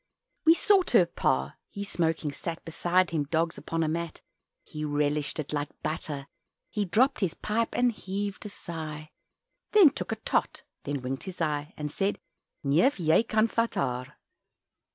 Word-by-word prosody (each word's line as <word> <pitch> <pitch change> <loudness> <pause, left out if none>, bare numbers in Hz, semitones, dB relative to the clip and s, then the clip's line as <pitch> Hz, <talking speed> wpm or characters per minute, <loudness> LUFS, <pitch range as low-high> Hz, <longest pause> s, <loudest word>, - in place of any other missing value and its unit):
We 325 +1 +8
sought 390 0 +4
her 190 -7 +7
Pa 65 - 0
he 200 - -5
smoking 165 -5 0
sat, 165 +3 -6
Beside 175 +2 +1
him 155 -3 0
dogs 165 +2 0
upon 165 0 -1
a - - +1
mat; 165 +1 -3 0.4
He 155 0 -6
relished 145 -1 0
it, 150 -1 -4
like 145 0 -1
butter 145 -2 -3 0.5
He 210 -1 0
dropped 255 +9 +3
his 185 -5 0
pipe 225 +2 0
and 245 0 +3
heaved 200 -1 -4
a - - -7
sigh, 155 -5 -7 0.6
Then 390 -9 +8
took - - -5
a - - +1
"tot" - - -1 0.2
then 140 -2 -3
winked 130 +1 -4
his 190 -2 -7
eye 150 -1 -1
And 150 -1 -4
said, 195 +5 0 0.5
"Neef 160 - +4
jij 165 +5 +3
kan 215 0 +3
vat 230 0 0
haar." 125 -1 -2
165 Hz, 165 wpm, -28 LUFS, 150-205 Hz, 0.6 s, We